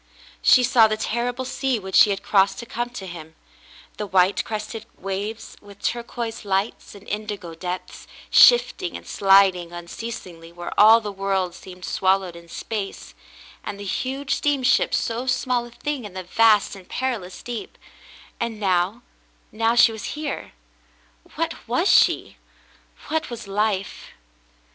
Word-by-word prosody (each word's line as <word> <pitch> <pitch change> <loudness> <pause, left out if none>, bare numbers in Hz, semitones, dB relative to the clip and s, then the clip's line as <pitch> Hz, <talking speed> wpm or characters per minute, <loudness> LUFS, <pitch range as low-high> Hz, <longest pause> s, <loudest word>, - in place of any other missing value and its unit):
She 255 - +6
saw 240 -3 +5
the 215 0 -2
terrible 245 +3 -2
sea 265 -1 -1
which 190 -2 -8
she 210 - +7
had 200 -1 -2
crossec^to 200 +3 +2
come 240 +2 -3
to 240 -6 -8
him 160 -3 -10 0.3
— - - -23
the 210 - -4
white 185 0 +3
crested 220 +1 -6
waves, 205 +4 -5
with 200 -1 -15
turquoise 235 -1 -4
lights 200 +2 -2
and 200 - -14
indigo 205 -5 -5
depths, 180 +2 -6 0.2
shifting 395 -7 +5
and - - -14
sliding 195 -3 +4
unceasingly 175 -1 -8
where 175 0 -7
all 220 +2 +7
the 210 -2 -5
world 195 -2 -1
seemed 180 -1 -11
swallowed 190 -2 +1
in 170 0 -13
space, 205 +2 -5 0.5
and 200 - -6
the - - -6
huge 265 +8 -2
steamship 275 -2 +2
so 235 +2 -2
small 250 -1 0
a - - -15
thing 290 +1 -4
in 205 -3 -9
the 185 - -5
vast 210 +2 +3
and 190 -2 -14
perilous 230 -9 -3
deep; 240 -2 -6 0.6
and 230 -2 -3
now 190 +3 0 0.2
— - - -37
now 225 +2 +1
she 235 -1 +6
was 220 +6 -6
here. 300 -2 -5 0.8
What - - -1
was - - +1
she? - - +3 0.7
What 320 +1 -1
was 235 -3 -7
life 200 -1 -1
210 Hz, 150 wpm, -23 LUFS, 190-235 Hz, 0.8 s, she